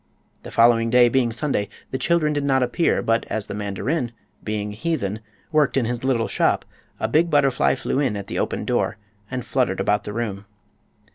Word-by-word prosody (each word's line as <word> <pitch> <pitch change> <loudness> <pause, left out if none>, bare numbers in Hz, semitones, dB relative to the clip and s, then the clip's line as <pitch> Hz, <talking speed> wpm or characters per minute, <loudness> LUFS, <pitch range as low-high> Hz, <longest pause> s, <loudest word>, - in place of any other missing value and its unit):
The - - -9
following 115 0 +4
day 120 0 +6
being 120 -1 +2
Sunday 115 -4 -1 0.2
the 130 - -2
children 155 +1 +2
did 145 -1 -1
not 135 -2 +2
appear, 125 +7 +1
but 115 0 +2
as 110 -2 -2
the - - -6
mandarin, 105 - -2 0.3
being 105 -1 -3
a - - -10
heathen, 110 -7 -2 0.3
worked 150 -3 +2
in 130 - +2
his 120 +1 -3
little 125 -4 +1
shop - - +1 0.3
a 110 - 0
big 155 +9 +2
butterfly 135 - +3
flew - - -2
in 130 -8 0
at 100 - -5
the - - -4
open - - -2
door - - 0 0.3
and 125 -1 -4
fluttered 120 -5 0
about 105 +1 +1
the 105 - -5
room. 105 -3 -3
120 Hz, 195 wpm, -23 LUFS, 105-135 Hz, 0.3 s, day